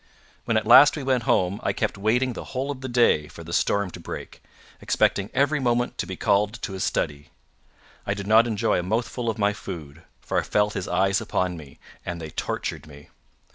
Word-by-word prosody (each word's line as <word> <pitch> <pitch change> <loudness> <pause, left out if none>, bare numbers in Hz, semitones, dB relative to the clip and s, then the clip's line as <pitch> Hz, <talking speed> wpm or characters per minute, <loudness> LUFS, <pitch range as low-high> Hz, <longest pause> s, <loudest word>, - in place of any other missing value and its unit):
When 115 - +1
at 110 - 0
last 145 +7 +8
we 145 - -4
went 130 -3 0
home, 95 +2 +2
I - - 0
kept - - -1
waiting 120 +6 +1
the - - -7
whole 135 +2 -1
of 135 -2 -7
the 130 - -5
day 120 -11 +3
for 85 - -11
the 85 +1 -8
storm 100 0 +1
to - - -9
break, - - -8 0.4
expecting 100 +1 +1
every 145 +3 +2
moment 120 -2 0
to - - -2
be - - -5
called 105 +1 +1
to 95 - -4
his 95 - -3
study. 70 -1 -2 0.8
I 100 - 0
did 100 -1 -6
not 110 +3 +5
enjoy 110 -2 +1
a - - -3
mouthful 115 +4 -2
of 110 - -2
my 105 -1 +2
food, 80 -7 -8 0.2
for - - -1
I - - 0
felt 105 0 +1
his 95 -2 -4
eyes 95 +2 +1
upon 90 -1 -1
me, 75 -5 -12 0.3
and 85 -1 -5
they 80 -2 -7
tortured 75 - -4
me. 75 -1 -14
105 Hz, 215 wpm, -24 LUFS, 90-120 Hz, 0.8 s, last